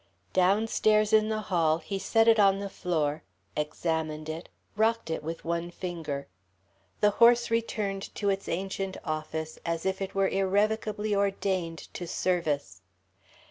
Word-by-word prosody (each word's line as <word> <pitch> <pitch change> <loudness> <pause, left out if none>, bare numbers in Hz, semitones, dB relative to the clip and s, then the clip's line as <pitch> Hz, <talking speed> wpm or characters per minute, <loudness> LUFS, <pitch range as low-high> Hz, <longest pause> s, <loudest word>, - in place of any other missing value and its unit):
Downstairs 215 +3 +3
in 215 0 +5
the 215 0 -1
hall 165 -5 +2
he 195 +4 -5
set 225 +3 +3
it 225 -1 +6
on 195 -1 +5
the 200 0 -5
floor, 155 -5 -1 0.3
examined 155 0 -2
it, 160 +2 -6 0.3
rocked 220 -4 +1
it 160 - -2
with 165 +2 -5
one 170 +1 -1
finger. 165 -6 -5 0.7
The 210 - +5
horse 235 +2 +5
returned 210 -4 -2
to 205 - 0
its 195 0 -1
ancient 190 +2 -3
office 155 0 -4
as 165 0 -2
if 190 0 -1
it 195 0 -4
were 195 0 +3
irrevocably 210 +2 +1
ordained 190 -4 -1
to 175 - -5
service. 150 - -1
190 Hz, 140 wpm, -28 LUFS, 165-210 Hz, 0.7 s, it